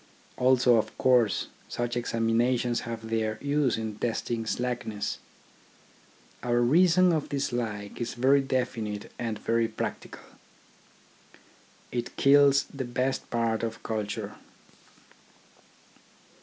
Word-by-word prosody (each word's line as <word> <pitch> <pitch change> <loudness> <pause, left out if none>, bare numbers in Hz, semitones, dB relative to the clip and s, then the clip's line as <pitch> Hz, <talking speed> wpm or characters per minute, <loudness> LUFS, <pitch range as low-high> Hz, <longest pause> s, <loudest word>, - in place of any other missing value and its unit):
Also, 125 -1 +4
of 110 - -2
course, 125 -5 +3 0.2
such 120 0 -2
examinations 120 +1 +1
have 110 -1 -6
their 110 -1 0
use 145 -3 +1
in 110 -2 -5
testing 115 -1 -2
slackness. 120 -4 -3 1.2
Our 120 -1 +1
reason 175 +7 +5
of 155 -2 -1
dislike 120 -7 -3
is 120 - -3
very 135 +3 +4
definite 120 -6 -3
and 115 -3 -2
very 115 +1 +1
practical. - - -6 1.7
It 120 -1 -4
kills 140 0 +5
the 135 -2 -3
best 125 +2 -2
part 115 -2 0
of 115 0 -4
culture. 105 -2 -4
120 Hz, 100 wpm, -28 LUFS, 115-130 Hz, 1.7 s, reason